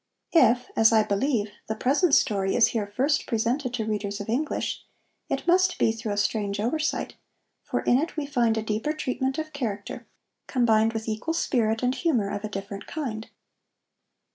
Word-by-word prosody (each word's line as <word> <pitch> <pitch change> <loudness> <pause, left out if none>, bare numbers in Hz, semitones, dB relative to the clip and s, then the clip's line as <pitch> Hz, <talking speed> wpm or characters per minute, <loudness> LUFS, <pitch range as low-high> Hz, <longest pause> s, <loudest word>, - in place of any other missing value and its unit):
If, 250 -6 +4
as 225 0 +5
I 220 -1 +5
believe, 210 0 0 0.2
the 220 - -2
present 280 - +3
story 195 -2 +1
is 240 - +5
here 215 -3 -2
first 265 +9 0
presented 240 +3 0
to 225 -3 -2
readers 205 -1 -3
of 205 - -6
English, 280 +7 -2 0.5
it - - -2
must 370 +1 +3
be - - +3
through 225 -1 -4
a - - -4
strange 205 -1 0
oversight, 305 +8 -1 0.5
for - - -2
in 245 - +3
it 320 +2 -3
we 300 - -1
find 240 -5 +1
a 220 - -1
deeper 220 +7 -1
treatment 265 -2 -2
of 310 -1 -4
character, 215 -8 -5 0.4
combined 225 -3 +3
with 220 0 -4
equal 225 +10 -2
spirit 225 -7 0
and 250 +1 +2
humor 250 - 0
of 205 0 -4
a 215 - -3
different 200 0 -6
kind. 235 -9 -5
225 Hz, 175 wpm, -26 LUFS, 215-280 Hz, 0.5 s, as